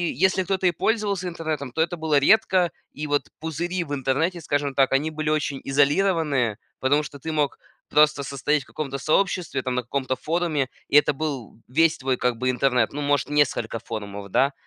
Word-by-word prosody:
если 190 +4 +3
кто-то 190 0 -1
и 180 - +5
пользовался 200 -1 -1
интернетом, 155 -6 -4
то 160 - -7
это 170 +2 +1
было 160 -3 +1
редко. 185 +2 +4 0.2
И 150 - -6
вот 145 -1 0
пузыри 170 +3 -2
в 145 -2 -6
интернете, 150 +6 0
скажем 145 -2 -1
так, 135 -1 +3
они 150 +4 +1
были 155 0 -2
очень 145 -3 -1
изолированные, 145 - +2 0.2
потому 145 +3 +2
что 140 -1 -9
ты 160 +4 -4
мог 150 -2 0 0.3
просто 150 -1 +4
состоять 140 +1 0
в - - -24
каком-то 140 -3 -4
сообществе, 160 0 0
там 130 -1 -2
на 125 - +1
каком-то 130 +1 -2
форуме, 155 -3 -1 0.2
и - - -1
это 150 - +6
был 135 -7 -5
весь 160 +5 +3
твой 130 -1 0
как 125 -1 0
бы 130 +2 0
интернет, 125 -2 +1
ну, 145 - -4
может, 145 -1 +1
несколько 125 -6 +1
форумов, 100 -3 -7
да. 135 +8 +2
145 Hz, 190 wpm, -24 LUFS, 135-165 Hz, 0.3 s, это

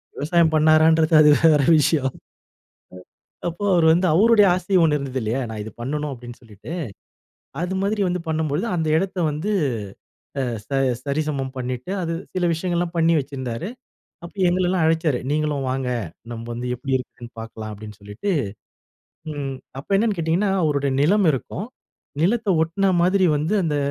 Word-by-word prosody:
விவசாயம் 165 +2 +2
பண்ணுனாரான்றது, 155 +1 +4
அது 150 - +6
வேற 155 -3 +6 0.2
விஷயம். 140 -2 +1 1.3
அப்போ 175 +4 -5
அவரு 170 -2 +4
வந்து 175 +3 +3
அவருடைய 210 +4 +5
ஆசை 185 +2 -1
1 150 -2 +3
இருந்தது 135 -2 -4
இல்லயா! 115 +5 -1
நான் 110 -1 -5
இது 110 - -8
பண்ணணும் 150 +4 -3
அப்பிடின்னு 120 -2 -10
சொல்லிட்டு, 110 - -10 0.9
அது 180 +2 -2
மாதிரி 205 +2 0
வந்து 180 0 -2
பண்ணும்பொழுது 160 +3 -1
அந்த 160 -1 -1
இடத்த 185 +2 -2
வந்து 155 +8 -3 0.9
அ - - +1 0.2
ச - - -45 0.3
சரிசமம் 140 -2 -2
பண்ணிட்டு 125 +5 -4
அது 165 -1 -2 0.2
சில 185 -1 0
விஷயங்கள்லாம் 175 0 -2
பண்ணி 165 0 +3
வச்சிருந்தாரு. 130 +2 -5 0.6
அப்ப 170 - -10
எங்களலாம் 180 0 +1
அழைச்சாரு. 160 -4 +1
"நீங்களும் 150 -2 0
வாங்க 130 0 -2 0.4
நம்ம 115 -1 -6
வந்து 120 +1 -5
எப்பிடி 130 +2 -3
இருக்குன்னு 125 -1 -10
பார்க்கலாம்" 110 -1 -7
அப்பிடின்னு 105 0 -10
சொல்லிட்டு, 105 - -5 1.0
ம் 140 -2 -4 0.3
அப்ப 195 - -2
என்னன்னு 210 0 +1
கேட்டீங்கன்னா, 170 +5 +1
அவருடைய 140 -2 0
நிலம் 195 +4 +3
இருக்கும். 160 - -5 0.6
நிலத்த 215 +3 +1
ஒட்ன 190 +4 +1
மாதிரி 185 +2 +3
வந்து 155 +8 -1
அந்த 155 -4 -1
155 Hz, 145 wpm, -22 LUFS, 135-175 Hz, 1.3 s, அது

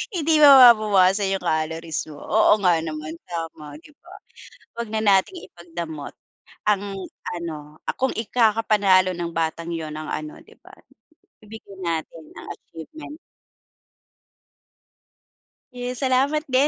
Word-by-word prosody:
Hindi 325 -2 0
mababawasan 215 -8 +6
'yong 190 - -6
calories 160 0 -2
mo. 150 - -11
Oo 215 0 +4
nga 180 -2 +5
naman, 155 -1 -6
tama 165 -4 -7
'di 300 - -18
ba. 355 +2 -15 0.7
'Wag 235 - -3
na 220 0 -1
nating 205 - +2
ipagdamot 165 -4 -8 0.5
ang 205 -2 +3 0.5
ano, 155 -3 -8
ah, - - -2
kung 265 0 0
ikakapanalo 210 -4 +2
ng 170 -1 -4
batang 165 +1 -2
'yon 155 -2 -5
ang 155 0 -7
ano 155 0 -6
'di - - -20
ba, - - -16 0.7
ibigay 210 -2 -12
natin 165 -1 -4
ang - - -10
achievement. 300 - -12 2.6
Yes, 250 +1 -5
salamat 270 +4 +1
din 260 +3 +4
185 Hz, 120 wpm, -22 LUFS, 165-235 Hz, 2.6 s, mababawasan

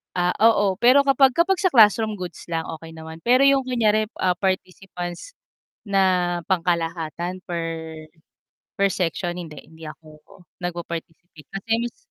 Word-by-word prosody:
Ah, 180 0 +1
oo, 205 -4 +4
pero 260 +7 +4
kapag 270 -1 +5
kapag 345 +7 +2
sa 370 - +3
classroom 215 -3 +4
goods 175 -3 -7
lang, 165 0 -2
okey 165 0 -8
naman. 160 0 -11
Pero 255 +3 +5
yung 275 -1 +4
kunyari, 220 -4 +1 0.2
ah, 180 -1 +1
participants 185 - -4 0.6
na 185 -3 +2
pangkalahatan 170 0 -2
per 170 -2 -3 1.2
per 200 - +4
section? 175 0 -2
Hindi 165 -4 -8
hindi 160 0 -17
ako 155 +1 -12 0.5
nagpa-participate. 170 -2 -7
Kasi 195 +3 -8
mas 240 - -5
180 Hz, 135 wpm, -23 LUFS, 165-220 Hz, 1.2 s, kapag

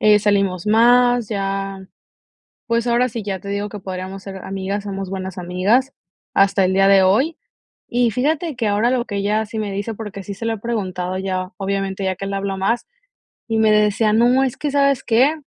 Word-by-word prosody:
eh, 210 -1 +6
salimos 200 -3 +1
más, 240 +1 +4
ya, 195 -2 -3 0.8
pues, 230 0 +1
ahora 245 +1 +2
sí, 225 -1 -5
ya 195 -2 -3
te 200 - -8
digo 200 +1 -2
que 210 0 -8
podríamos 190 0 -6
ser 195 -1 -7
amigas, 195 +1 -3
somos 195 -2 -5
buenas 190 -1 -5
amigas 195 +10 +1 0.4
hasta 195 0 +4
el 185 0 +2
día 195 +1 +4
de 195 -1 +6
hoy. 245 - +2 0.5
Y 240 -1 +1
fíjate 305 - -1
que 230 - -1
ahora 210 +3 +2
lo 250 -2 +1
que 205 - -5
ella 210 +2 0
sí 220 +1 -6
me 210 -2 -2
dice, 200 +3 -3
porque 210 -2 -7
sí 200 - -7
se 200 +4 -6
lo 225 - 0
he - - -7
preguntado 185 -5 -3
ya, 185 -1 -3
obviamente, 195 0 -2
ya 190 -1 -1
que 195 - -6
le 200 - -3
habló 195 0 -2
más, 200 +5 0 0.6
y 225 - 0
me 220 -1 +4
decía: 210 +1 +3
"No, 245 +4 +4
es 260 - -3
que, 295 - -2
¿sabes 280 -2 +2
qué?, 250 +6 +3
205 Hz, 205 wpm, -20 LUFS, 195-235 Hz, 0.8 s, eh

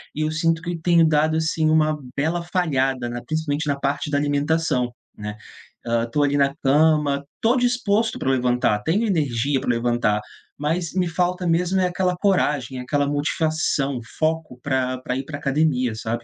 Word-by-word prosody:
E 155 - -2
eu 155 - -1
sinto 165 +1 +1
que 170 0 -4
tenho 170 -1 +4
dado, 155 +1 +2
assim, 160 0 +1
uma 155 -1 +3 0.2
bela 165 +4 0
falhada 135 -9 0
na 120 0 -5
principalmente 155 -1 -2
na 140 -1 0
parte 140 +1 -1
da 145 - +2
alimentação, 145 -3 0 0.3
né. 105 0 -6 0.5
Hã, 115 0 +1
estou 145 +5 0
ali 145 0 +1
na 140 0 +2
cama, 145 0 +3
estou 235 +3 +2
disposto 235 -3 +1
pra 135 - -1
levantar, 125 -4 +1
tenho 205 +8 +1
energia 140 - 0
pra - - -3
levantar, 115 -3 +1 0.4
mas 165 +3 -2
me 180 -2 +1
falta 180 +2 -1
mesmo 180 +3 +1
é 180 - +3
aquela 180 0 0
coragem, 145 - +1
aquela 145 +3 0
motivação, 145 -2 0 0.2
foco 155 -5 -1
pra 130 -2 0
pra 125 - -2
ir 135 - -4
pra 145 -1 -6
academia, 135 -4 +1
sabe? 115 +1 -4
150 Hz, 170 wpm, -22 LUFS, 130-165 Hz, 0.5 s, tenho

